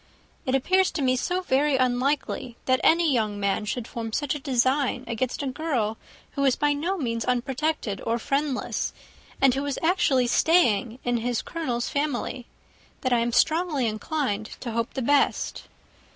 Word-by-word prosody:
It 260 - +2
appears 370 +8 +3
to 310 - -2
me 255 -1 +3
so 355 +8 -1
very 290 -3 +2
unlikely 255 -1 0
that 255 0 +2
any 330 -2 +4
young 215 -4 0
man 200 +1 0
should 235 +2 -3
form 230 -3 -5
such 290 +1 0
a 295 - -4
design 260 0 +1
against 240 +4 -2
a - - -2
girl 255 -6 -1 0.3
who 280 - -2
is 270 -2 +4
by 295 0 +2
no 340 +7 -1
means 230 -7 -2
unprotected 250 -3 -1
or 230 +1 0
friendless, 275 +2 -1 0.5
and 270 -2 +5
who 270 - -1
was 285 -1 -2
actually 320 -7 +3
staying 240 - +3
in 245 -1 +1
his 235 0 -1
Colonel's 250 -8 -3
family, 275 -3 -2 0.5
that 255 -1 +1
I 240 - +4
am 235 +1 0
strongly 315 0 +2
inclined 220 -1 -2
to 240 - -4
hope 230 +1 -2
the 265 - -2
best. 285 +3 +1
260 Hz, 165 wpm, -25 LUFS, 235-295 Hz, 0.5 s, and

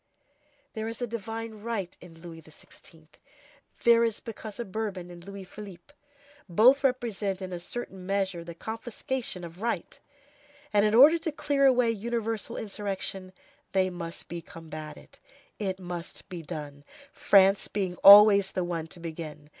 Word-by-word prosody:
There 220 -1 -4
is 230 0 -6
a 245 - -1
divine 225 -1 -6
right 210 -5 -4
in 165 -2 -14
Louis 165 -2 -9
XVI., 160 +1 -17 0.8
there 235 -1 +6
is 225 -2 0
because 220 -1 -8
a 235 - -3
Bourbon 190 -3 -4
in 175 - -11
Louis 195 +2 -9
Philippe; 195 +5 -12 0.6
both 250 +11 +5
represent 225 -7 -1
in 185 -1 -6
a 175 - -4
certain 190 0 -7
measure 195 -3 -1
the 170 0 -9
confiscation 225 0 -5
of 170 +2 -10
right, 230 -6 -3 0.7
and, 205 0 +4
in 210 +1 +2
order 300 +7 +8
to 320 - -3
clear 285 -2 +2
away 250 -3 +4
universal 225 0 -3
insurrection, 195 -3 -5 0.4
they 190 -1 +2
must 170 -1 -7
be 170 0 -6
combated; 155 -4 -10 0.4
it 190 -3 -2
must 175 -2 -7
be 180 -3 -6
done, 145 -2 -8 0.3
France 195 0 +4
being 190 -3 -2
always 200 0 +9
the 185 - -1
one 170 -2 -3
to 170 - -13
begin. 155 -3 -8
195 Hz, 150 wpm, -28 LUFS, 175-225 Hz, 0.8 s, always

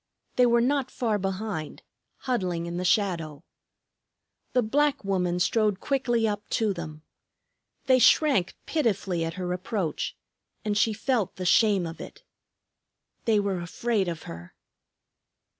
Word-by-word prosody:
They 250 -1 +5
were 235 0 +4
not 265 +1 +1
far 220 -4 -1
behind, 190 -4 -4 0.4
huddling 185 -10 -1
in 170 0 -4
the 180 - -2
shadow. 170 -6 0 1.1
The 250 -1 +3
black 285 +2 +1
woman 180 -2 0
strode 210 +1 +2
quickly 240 -5 +1
up 210 -1 -4
to 215 -3 +1
them. 155 -3 -8 0.8
They 260 -1 +5
shrank 250 - +4
pitifully 200 - 0
at 165 0 -3
her 180 -1 -2
approach, 185 -2 -3 0.5
and 210 -1 0
she 215 +2 +3
felt 220 -1 -1
the 185 - -5
shame 200 -1 +4
of 165 0 -7
it. - - -11 1.0
They 220 -2 +3
were 200 -3 -1
afraid 200 +3 -1
of 170 -2 -4
her! 85 +1 -10
200 Hz, 135 wpm, -27 LUFS, 175-235 Hz, 1.1 s, They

